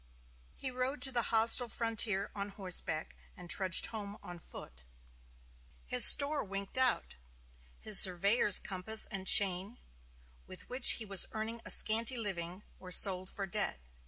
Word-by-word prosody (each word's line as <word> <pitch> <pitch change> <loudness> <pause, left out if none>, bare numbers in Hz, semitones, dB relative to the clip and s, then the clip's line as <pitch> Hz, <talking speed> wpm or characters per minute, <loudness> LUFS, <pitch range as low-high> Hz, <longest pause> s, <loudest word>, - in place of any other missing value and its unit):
He 260 - -6
rode 255 +3 -6
to 270 - -2
the 245 -2 0
hostile 230 +2 +1
frontier 220 -4 -3
on 200 0 -8
horseback, 180 -5 -5 0.2
and 180 - -14
trudged 190 -3 +1
home 205 -2 -10
on 175 -1 -12
foot. 60 - -13 1.0
His - - +3
store 285 +1 +5
"winked 195 0 -9
out." 260 -1 -1 0.7
His 210 -2 +2
surveyor's 200 +3 +3
compass 205 +3 +1
and 195 -3 -9
chain, 195 +3 +2 0.7
with - - -13
which 250 0 +5
he 225 - -8
was 195 -3 +1
earning 225 +1 -8
a - - -8
scanty 225 +3 +2
living, 185 -3 -7 0.2
were 185 -1 -14
sold 185 0 +3
for 200 - -7
debt. 195 - -3
205 Hz, 145 wpm, -30 LUFS, 185-230 Hz, 1.0 s, store